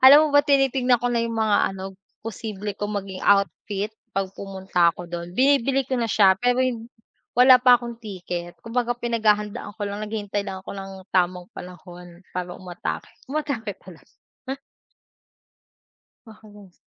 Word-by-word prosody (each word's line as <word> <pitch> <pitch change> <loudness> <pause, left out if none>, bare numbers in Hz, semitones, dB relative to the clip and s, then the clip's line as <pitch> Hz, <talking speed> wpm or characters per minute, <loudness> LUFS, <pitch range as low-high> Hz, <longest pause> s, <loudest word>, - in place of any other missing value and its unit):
alam 285 +4 +9
mo - - +1
ba, 285 - +7
tinitignan 270 -3 +3
ko 245 +1 -1
na 235 - +2
yung 230 0 -2
mga 220 -2 +3 0.2
ano, 190 0 -7 0.4
posible 210 -1 -5
kong 205 +1 -4
maging 190 -1 -8
outfit 200 +1 +1 0.2
'pag 195 -1 -1
pumunta 190 -3 +1
ako 175 - -9
do'n. 170 0 -6
Binibili 270 0 +3
ko - - -5
na - - +1
siya, 200 -3 +6
pero 245 +1 +2
hin 235 -3 -2 0.5
wala 255 +1 +8
pa 250 -1 +7
akong 235 -1 -6
ticket, 180 -5 -6
kumbaga, 240 +1 -1
pinaghahandaan 215 -4 0
ko 215 - -6
lang, 205 +1 -4
naghihintay 205 -1 -3
lang 190 -1 -5
ako 195 - -8
ng 195 0 -7 0.2
tamang 180 -1 0
panahon 180 -1 -11
para 180 -1 -4
umatake. 180 +3 -5 0.2
Umatake 275 -7 -3
talaga. 180 -3 -14 2.2
Pa 220 - -11
halos 205 -4 -15
210 Hz, 155 wpm, -24 LUFS, 190-245 Hz, 2.2 s, alam